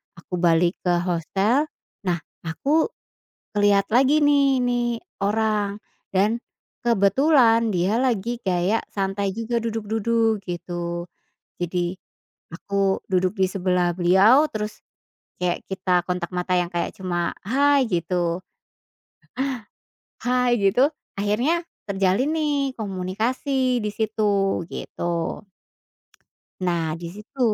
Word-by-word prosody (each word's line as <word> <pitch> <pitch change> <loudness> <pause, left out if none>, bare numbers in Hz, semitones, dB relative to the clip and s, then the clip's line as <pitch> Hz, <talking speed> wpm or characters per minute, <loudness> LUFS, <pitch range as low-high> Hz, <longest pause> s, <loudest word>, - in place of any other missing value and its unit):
aku 170 +1 -15
balik 170 +1 +3
ke 175 - +4
hostel 195 - +1 0.4
nah 175 - +3 0.3
aku 285 - +1 0.7
liat 200 0 +3
lagi, 270 +6 +4
nih 280 -3 +4
nih, 245 -1 +1 0.4
orang, 210 -1 0 0.3
dan 210 +5 +3 0.5
kebetulan 230 +1 +4
dia 185 +6 +1
lagi 240 -2 0
kaya 185 +4 +2 0.2
santai 195 0 -1
juga 230 +2 -1
duduk-duduk, 225 0 0
gitu. 175 -1 -4 0.6
Jadi, 175 0 -1 0.6
aku 195 +2 0
duduk 185 +1 +2
di 190 - +4
sebelah 180 -2 +1
beliau 195 - +5
terus 210 0 -4 0.6
kayak 180 -1 0
kita 185 -2 +1
kontak 180 -2 -2
mata 180 +1 -1
yang 175 - +1
kayak 175 0 -1
cuma 175 -2 -1 0.2
"Hai" 280 +3 +3
gitu. 175 0 0 1.8
"Hai!" 250 -1 +2
Gitu 200 +3 +3 0.3
akhirnya 235 +12 +1 0.2
terjalin, 200 +6 +1
nih, 305 -2 0 0.2
komunikasi 235 +6 -1
di - - 0
situ, 220 0 -2 0.5
gitu. - - -7 1.6
Nah 170 -2 +1 0.2
di 170 - -5
situ 210 +6 -13
205 Hz, 105 wpm, -23 LUFS, 180-240 Hz, 1.8 s, beliau